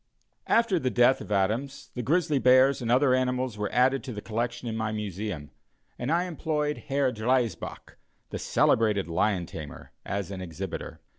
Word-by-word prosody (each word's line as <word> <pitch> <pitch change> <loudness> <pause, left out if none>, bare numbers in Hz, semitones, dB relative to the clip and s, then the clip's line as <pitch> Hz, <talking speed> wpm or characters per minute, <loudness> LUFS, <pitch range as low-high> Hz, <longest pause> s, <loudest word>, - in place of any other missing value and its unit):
After 230 -6 +3
the 130 - 0
death 120 +3 +4
of - - -9
Adams, 110 +8 -1
the 125 - -3
grizzly 155 +2 +1
bears 130 +2 +5
and 120 -1 -1
other 130 +1 +4
animals 130 -2 0
were 105 0 -3
added 130 +2 +3
to 130 - -5
the 105 - -5
collection 120 +3 -3
in 110 - -3
my 110 -1 -1
Museum, 100 -7 -4 0.5
and 125 +4 -2
I 170 +2 +3
employed 150 -4 -2
Herr 135 -1 +1
Driesbach, 120 +1 -2 0.3
the - - -4
celebrated 105 -4 +2
lion 90 +2 +1
tamer, 75 -3 -9
as 100 -1 -3
an 95 -1 -5
exhibitor. 90 +1 -6
120 Hz, 165 wpm, -27 LUFS, 105-135 Hz, 0.5 s, bears